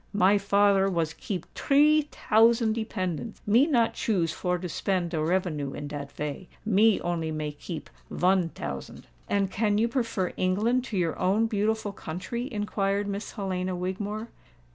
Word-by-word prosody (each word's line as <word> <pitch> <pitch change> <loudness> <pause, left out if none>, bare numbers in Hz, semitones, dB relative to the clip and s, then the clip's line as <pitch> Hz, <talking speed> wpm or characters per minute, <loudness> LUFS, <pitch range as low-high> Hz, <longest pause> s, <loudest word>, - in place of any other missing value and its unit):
My 205 0 +5
father 200 -1 +3
was 165 -4 -1
keep 185 -1 -5
tree 300 +2 +4
tousand 225 +1 +3
dependants: 215 -2 -3
me 235 +8 +5
not 235 -7 +2
choose 180 -7 0
for 180 0 -1
to 180 +1 -5
spend 180 0 -1
de 155 -3 -1
revenue 155 -5 -1
in 145 - -5
dat 145 -1 -6
vay—me 195 +8 +1
only 170 -2 -2
may 155 -1 -3
keep 155 +2 -7 0.2
von 180 -1 +2
tousand." 75 - -7 0.2
"And 195 -2 +1
can 205 0 +1
you 225 +2 +3
prefer 230 -7 -1
England 220 +7 +1
to 220 -6 -4
your 170 -3 0
own 195 +5 +2
beautiful 220 0 0
country?" 215 - -5
inquired 205 -2 -1
Miss 200 +1 -4
Helena 185 -3 -2
Wigmore. 205 +5 -4
195 Hz, 150 wpm, -27 LUFS, 175-220 Hz, 0.2 s, My